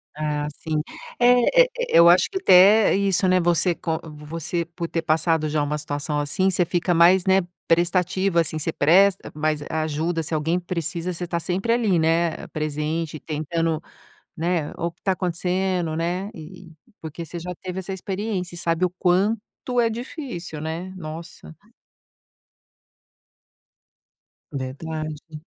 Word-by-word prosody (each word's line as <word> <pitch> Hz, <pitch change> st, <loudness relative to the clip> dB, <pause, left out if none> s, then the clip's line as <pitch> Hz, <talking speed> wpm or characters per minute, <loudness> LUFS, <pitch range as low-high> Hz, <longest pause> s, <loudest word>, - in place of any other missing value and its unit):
Ah, 150 Hz, -1 st, -2 dB
sim. 155 Hz, -2 st, -2 dB, 0.4 s
E 245 Hz, 0 st, +5 dB, 0.3 s
E -, -, +2 dB
eu 170 Hz, 0 st, +8 dB
acho 175 Hz, +2 st, +5 dB
que 385 Hz, -, -3 dB
até 205 Hz, -, +6 dB
isso, 195 Hz, -2 st, +2 dB
né, 185 Hz, 0 st, +4 dB
você 175 Hz, 0 st, +2 dB
com 160 Hz, -1 st, -3 dB
você 160 Hz, +3 st, -4 dB
por 170 Hz, 0 st, -6 dB
ter 165 Hz, -, -1 dB
passado 160 Hz, 0 st, +1 dB
já 150 Hz, 0 st, 0 dB
uma 150 Hz, +1 st, -2 dB
situação 145 Hz, 0 st, -3 dB
assim, 185 Hz, +7 st, +1 dB
você 180 Hz, -1 st, +2 dB
fica 175 Hz, +1 st, 0 dB
mais, 175 Hz, +2 st, +5 dB
né, 190 Hz, 0 st, +4 dB, 0.3 s
prestativa, 175 Hz, +1 st, +2 dB
assim. 155 Hz, -1 st, -2 dB
Você 160 Hz, +2 st, -2 dB
presta 190 Hz, +6 st, +3 dB
mais 155 Hz, 0 st, -1 dB
ajuda. 160 Hz, +2 st, -1 dB
Se 160 Hz, -, -4 dB
alguém 160 Hz, +3 st, 0 dB
precisa, 175 Hz, 0 st, -3 dB
você 175 Hz, +1 st, -4 dB
tá 170 Hz, 0 st, -2 dB
sempre 190 Hz, +6 st, -1 dB
ali, 225 Hz, -6 st, +2 dB
né, 165 Hz, 0 st, +1 dB
presente, 155 Hz, +1 st, -3 dB
tentando, 160 Hz, +1 st, -2 dB, 0.6 s
né, 165 Hz, -2 st, -1 dB
o 170 Hz, -, -2 dB
que 170 Hz, -, -31 dB
está 190 Hz, -, +1 dB
acontecendo, 180 Hz, -1 st, -1 dB
né? 175 Hz, +4 st, -2 dB
E 170 Hz, +2 st, -11 dB, 0.3 s
porque 160 Hz, +1 st, -7 dB
você 170 Hz, +2 st, -7 dB
já 180 Hz, +2 st, -6 dB
teve 185 Hz, 0 st, -5 dB
essa 190 Hz, +1 st, -5 dB
experiência 190 Hz, -1 st, -4 dB
e -, -, -4 dB
sabe 165 Hz, +1 st, 0 dB
o 180 Hz, -, +1 dB
quanto 210 Hz, +6 st, 0 dB
é 230 Hz, -, +3 dB
difícil, 230 Hz, -, -6 dB
né? 165 Hz, +4 st, -5 dB
Nossa. 160 Hz, -1 st, -9 dB, 3.0 s
Verdade. 155 Hz, +3 st, -6 dB
170 Hz, 145 wpm, -23 LUFS, 155-185 Hz, 3.0 s, eu